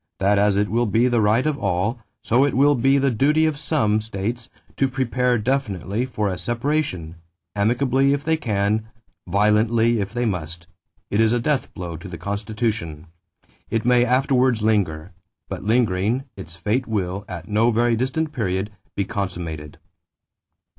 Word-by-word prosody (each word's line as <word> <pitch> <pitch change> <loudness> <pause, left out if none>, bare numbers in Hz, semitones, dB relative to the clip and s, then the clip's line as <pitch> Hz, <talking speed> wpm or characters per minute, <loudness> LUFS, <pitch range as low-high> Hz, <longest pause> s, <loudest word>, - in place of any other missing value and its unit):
that 100 +1 +2
as 100 -1 +3
it 105 0 +2
will 120 +2 +1
be 115 +5 +3
the 120 -2 +2
right 110 +5 +3
of 150 -2 0
all, 95 +7 -1 0.2
so 120 +4 +3
it 145 - +1
will 145 +3 +5
be 135 +2 +3
the 135 -1 +2
duty 150 +7 +3
of 155 -1 +1
some 110 -10 +1
[states] 110 +3 -4 0.3
to 135 - +2
prepare 125 -1 0
definitely 115 -2 -1
for 105 -5 -2
a 90 -2 -3
separation; 120 - -2 0.4
amicably 125 +6 +2
if 140 0 0
they 160 +1 +2
can, 110 -5 -1 0.4
violently 110 +4 +3
if 100 -1 -3
they 120 +1 -1
must.... 85 -4 -4 0.5
It 100 - +2
is 110 +1 +3
a 120 - +2
death 145 +2 -1
blow 85 -3 -5
to 85 - -10
the 90 -2 -7
Constitution. 100 -4 -3 0.6
It 115 0 -1
may 125 0 +5
afterwards 125 -2 +2
linger; 95 -6 0 0.4
but - - -6
lingering, 110 +1 +1
its 85 -3 -10
fate 105 +8 -1
will, 100 -3 -2
at 85 -1 -7
no 110 +3 +2
very 120 +1 +2
distant 135 +6 -1
period, 100 -4 -2 0.2
be 100 - 0
consummated." 85 -7 -5
110 Hz, 160 wpm, -22 LUFS, 100-125 Hz, 0.6 s, will